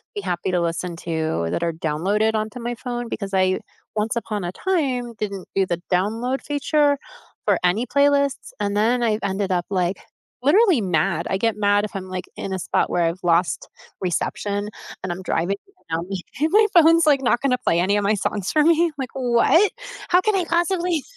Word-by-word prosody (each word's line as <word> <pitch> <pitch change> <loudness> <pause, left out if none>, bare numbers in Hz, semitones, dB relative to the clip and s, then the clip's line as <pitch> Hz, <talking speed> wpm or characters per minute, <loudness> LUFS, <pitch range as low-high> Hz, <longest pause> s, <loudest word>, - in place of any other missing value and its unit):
be 205 - -3
happy 180 -1 -2
to 180 - +1
listen 170 +1 -2
to, 160 - -2
that 170 - -1
are 170 -1 0
downloaded 190 +8 0
onto 215 +3 -3
my 240 +1 -3
phone 240 -1 -5
because 200 -2 -5
I, 185 0 +2 0.4
once 215 +2 0
upon 210 -4 -3
a 175 - -3
time, 265 -10 -1
didn't 200 -3 -4
do 195 -1 +3
the 175 -1 -3
download 225 +8 0
feature 290 0 +1 0.5
for - - +3
any 185 +7 +2
playlists, 280 0 +2
and 205 0 -1
then, 235 +3 +2
I'd 215 -2 +1
ended 195 0 -1
up, 175 -1 0
like, 185 -1 0 0.5
literally 355 - +5
mad. 170 -2 0
I 190 - +1
get 225 0 0
mad 205 0 +3
if 210 - -9
I'm, 190 - -4
like, 185 -1 -4
in 195 - -4
a 190 - -2
spot - - 0
where 175 - +1
I've 165 +2 -1
lost 170 +1 +1 0.3
reception 200 +3 -2 0.3
and 185 - -2
I'm 175 +2 -5
driving, 185 +5 0 0.3
and 160 0 0
now - - -4
me 190 -2 -3 0.2
and 310 +3 +1
my 430 +1 +6
phone's, 330 -1 +6
like, 285 -3 +4
not 240 -2 +2
gonna 255 -2 +2
play 170 - +2
any 200 +3 +2
of 205 - 0
my 210 +2 +2
songs 200 -1 -2
for 305 - +3
me, 335 +1 +4
like, 265 -3 -4
"What? 260 - +3 0.4
How 360 +1 +5
can 430 +1 +1
I 365 -3 +1
possibly 345 -1 0
210 Hz, 200 wpm, -22 LUFS, 185-275 Hz, 0.5 s, my